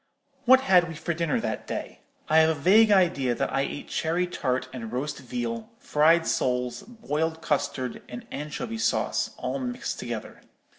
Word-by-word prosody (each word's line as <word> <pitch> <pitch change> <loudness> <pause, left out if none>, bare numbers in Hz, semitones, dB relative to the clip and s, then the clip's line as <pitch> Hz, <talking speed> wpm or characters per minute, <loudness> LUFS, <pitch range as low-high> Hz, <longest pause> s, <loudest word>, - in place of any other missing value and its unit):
"What 260 +1 +7
had 180 -9 +4
we 165 - -7
for 170 +3 -2
dinner 165 -3 0
that - - -4
day? - - -5 0.3
I 155 - +3
have 160 0 +5
a 160 -2 -1
vague 215 +8 +6
idea 170 -11 +3
that - - -2
I 135 - +2
ate 140 +1 -4
cherry 170 +3 0
tart 130 -7 -2
and 115 -4 -6
roast 135 +5 -3
veal, 120 -3 -4
fried 165 +3 +3
soles, 125 -1 0
boiled 160 -8 -3
custard, 140 -4 -1
and 120 - -8
anchovy 150 +10 -5
sauce, - - 0
all - - -3
mixed 250 -1 -4
together. - - -6
155 Hz, 165 wpm, -26 LUFS, 130-180 Hz, 0.3 s, What